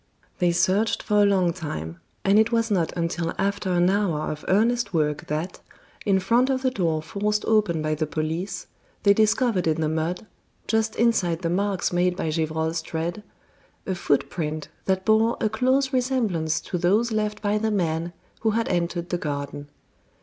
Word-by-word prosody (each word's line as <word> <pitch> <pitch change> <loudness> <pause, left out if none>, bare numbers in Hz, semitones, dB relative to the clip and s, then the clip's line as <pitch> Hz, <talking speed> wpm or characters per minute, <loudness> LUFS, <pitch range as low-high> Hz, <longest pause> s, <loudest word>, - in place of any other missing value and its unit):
They 175 -2 +3
searched 190 +5 +1
for 210 -1 +3
a 205 - +5
long 185 -4 +2
time, 85 - -6 0.3
and 200 +2 +5
it 220 +1 +3
was 230 -1 +1
not 175 -5 +1
until 170 0 -2
after 200 0 -1
an 175 0 +3
hour 190 -6 0
of 150 -1 -7
earnest 225 0 +2
work 150 -2 0
that, 155 +5 -3 0.5
in 195 -1 +4
front 240 +7 +2
of 260 0 0
the 260 - +2
door 165 -8 0
forced 210 +5 -1
open 205 -8 +2
by 155 0 0
the 155 0 -1
police, 160 +5 -3 0.4
they 200 - +6
discovered 215 -2 +2
in 160 0 +1
the 155 - +1
mud, 160 +5 -2 0.4
just 220 -1 +1
inside 190 -8 +1
the 165 - 0
marks 195 0 0
made 180 0 +2
by 160 - -1
Gevrol's 160 +1 -1
tread, 170 +5 -4 0.6
a 190 - -1
footprint 155 -1 -1 0.2
that 190 0 0
bore 220 +1 +3
a 215 - +1
close 260 +5 +1
resemblance 225 -12 0
to 180 - -4
those 210 +7 +2
left 210 -1 -1
by 210 +1 +1
the 220 +1 0
man 170 -4 -1 0.3
who 225 - +1
had 230 - 0
entered 175 0 -1
the 175 - -1
garden. 145 -1 -4
185 Hz, 175 wpm, -24 LUFS, 160-215 Hz, 0.6 s, they